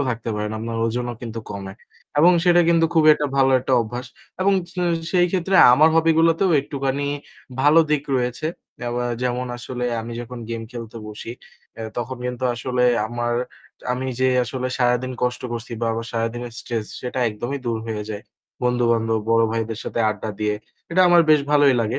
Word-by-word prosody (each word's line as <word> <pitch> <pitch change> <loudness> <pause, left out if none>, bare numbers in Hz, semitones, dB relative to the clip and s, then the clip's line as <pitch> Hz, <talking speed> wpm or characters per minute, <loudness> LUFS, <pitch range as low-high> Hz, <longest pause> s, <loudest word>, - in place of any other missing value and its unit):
থাকতে 115 -1 -4
পারেন। 105 0 -2
আপনার 115 +1 -4
ওজনও 120 +1 -2
কিন্তু 115 -1 -5
কমে 100 -1 -6 0.5
এবং 170 +4 +7
সেটা 175 -1 +5
কিন্তু 165 -1 +4
খুব 160 -2 +4
একটা 150 - -2
ভালো 135 -1 +4
একটা 130 - -2
অভ্যাস 120 +2 -5 0.3
এবং 195 +1 +3 0.2
স - - -23 0.4
সেই 175 -1 +4
ক্ষেত্রে 190 +1 -1 0.2
আমার 155 +5 +6
hobby 165 0 +4
গুলোতেও 165 +3 +3
একটুখানি 140 0 -3 0.6
ভালো 145 +4 +5
দিক 150 -2 +2 0.2
রয়েছে। 125 +5 -2 0.4
এবা 120 +1 -2 0.2
যেমন 125 0 -1
আসলে 125 0 -5 0.2
আমি 115 +1 -7
যখন 120 +1 -8
game 115 -1 -4
খেলতে 115 -2 -8
বসি, 105 +2 -8 0.5
এ - - -5
তখন 125 +2 -3
কিন্তু 125 +1 -4
আসলে 125 +1 -1 0.2
আমার 120 +1 -2 0.6
আমি 130 +1 -3
যে 130 - +4 0.2
আসলে 130 +1 -3
সারাদিন 125 +1 +1
কষ্ট 125 -1 -1
করছি 120 0 -6
বা 115 - 0
আমার 115 0 -4
সারাদিনের 115 +1 -3
stress 115 -3 -4
সেটা 125 0 -4
একদমই 120 +6 -4
দূর 115 -1 0
হয়ে 110 -2 -3
যায়। 105 0 -5 0.4
বন্ধু-বান্ধব, 115 -2 +2
বড় 115 0 +4
ভাইদের 115 -1 -2
সাথে - - -2
আড্ডা 105 +1 -5
দিয়ে 105 0 +1 0.4
এটা 175 +2 +3
আমার 175 -1 +6
বেশ 155 -1 +6
ভালোই 145 -2 +5
লাগে। 115 +3 -1
125 Hz, 175 wpm, -22 LUFS, 115-140 Hz, 0.6 s, এবং